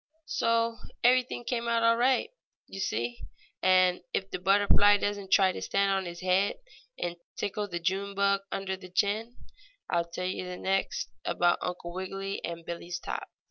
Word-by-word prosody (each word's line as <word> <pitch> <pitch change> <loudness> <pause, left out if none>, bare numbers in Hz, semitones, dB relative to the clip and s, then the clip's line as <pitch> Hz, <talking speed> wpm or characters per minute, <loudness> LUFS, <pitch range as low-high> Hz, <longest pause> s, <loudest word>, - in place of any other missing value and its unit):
So 230 -3 +1 0.3
everything 250 0 +3
came 235 -1 -2
out 230 0 +2
all 230 0 +5
right, 260 - +2 0.3
you 195 - -9
see, 120 - -2 0.4
and 185 -1 +4
if 195 0 -2
the - - -3
butterfly 205 +2 +5
doesn't 205 -1 -2
try 190 -1 +5
to - - -6
stand 200 0 +1
on 190 -2 0
its 175 +1 -7
head 185 +2 +2 0.4
and 175 0 -3 0.2
tickle 205 +1 -2
the 175 -3 -4
June 195 +3 -1
bug 200 0 +2
under 195 -1 -2
the 185 -1 -12
chin, 215 +6 0 0.5
I'll 170 -1 +1
tell 180 +2 -4
you 180 0 -3
next 190 - -1
about 175 0 +2
Uncle 175 -1 -4
Wiggily 195 +1 -4
and 170 -1 -5
Billie's 170 +1 -5
top. - - -5
195 Hz, 165 wpm, -29 LUFS, 180-205 Hz, 0.5 s, all